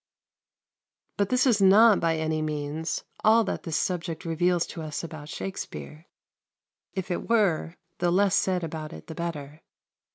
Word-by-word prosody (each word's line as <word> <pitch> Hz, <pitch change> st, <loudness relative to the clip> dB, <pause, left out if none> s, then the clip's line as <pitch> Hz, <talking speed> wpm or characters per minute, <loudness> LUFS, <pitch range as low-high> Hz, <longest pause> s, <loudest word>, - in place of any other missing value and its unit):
But 200 Hz, -1 st, +1 dB
this 250 Hz, +1 st, +3 dB
is 230 Hz, -6 st, +3 dB
not 205 Hz, +3 st, +7 dB
by 165 Hz, -1 st, +1 dB
any 155 Hz, 0 st, -1 dB
means 155 Hz, +1 st, -3 dB, 0.2 s
all 225 Hz, +1 st, +6 dB
that 200 Hz, -, -3 dB
this 160 Hz, -3 st, -2 dB
subject 170 Hz, -2 st, -2 dB
reveals 175 Hz, +1 st, +1 dB
to 165 Hz, -, -8 dB
us 155 Hz, 0 st, -5 dB
about 155 Hz, -3 st, -8 dB
Shakspere; 170 Hz, -3 st, -7 dB, 0.9 s
if 190 Hz, -1 st, -3 dB
it 175 Hz, -, -3 dB
were, 185 Hz, -7 st, +2 dB, 0.2 s
the 175 Hz, -, +2 dB
less 190 Hz, +2 st, +3 dB
said 185 Hz, -2 st, +1 dB
about 155 Hz, -1 st, -5 dB
it -, -, -10 dB
the 160 Hz, -, -8 dB
better. 155 Hz, -2 st, -5 dB
170 Hz, 155 wpm, -27 LUFS, 155-195 Hz, 0.9 s, not